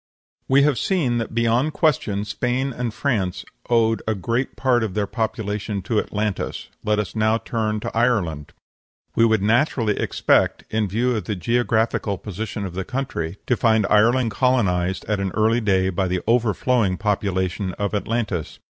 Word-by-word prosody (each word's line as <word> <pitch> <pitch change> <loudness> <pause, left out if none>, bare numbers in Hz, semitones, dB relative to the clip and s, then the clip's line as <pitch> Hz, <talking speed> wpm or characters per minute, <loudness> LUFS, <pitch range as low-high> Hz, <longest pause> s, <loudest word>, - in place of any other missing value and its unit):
We 140 +1 +5
have 140 -5 +2
seen 140 -11 +1
that 115 0 -5
beyond 120 +6 +2
question 105 - +1
Spain 125 +5 -1
and 120 -2 -2
France 105 -7 -1 0.2
owed 115 -2 +3
a 110 - +1
great 115 +7 -2
part 125 -3 +2
of 105 -4 -3
their 105 -1 +1
population 105 -2 -3
to 105 +3 +1
Atlantis. 105 -1 -3
Let 105 0 +1
us 105 -4 -2
turn 110 - -4
now 110 +1 +3
to 110 -2 -3
Ireland. 100 - 0 0.6
We 115 - +5
would 110 -3 +2
naturally 115 -1 +2
expect, - - +2
in 110 -1 +1
view 120 +6 0
of 110 - -3
the 105 - -2
geographical 110 0 0
position 105 +1 -5
of 90 - -6
the 95 +1 -3
country, 120 -10 -4
to 125 - +2
find 110 -3 +3
Ireland 115 +3 +4
colonized 95 -7 +1
at 105 -1 -1
an 100 -1 -1
early 115 +2 +2
day 95 -3 +2
by 95 +1 0
the 90 0 -1
overflowing 115 -3 +2
population 95 -2 -1
of 100 +2 -3
Atlantis. 105 -5 -2
110 Hz, 165 wpm, -22 LUFS, 100-120 Hz, 0.6 s, We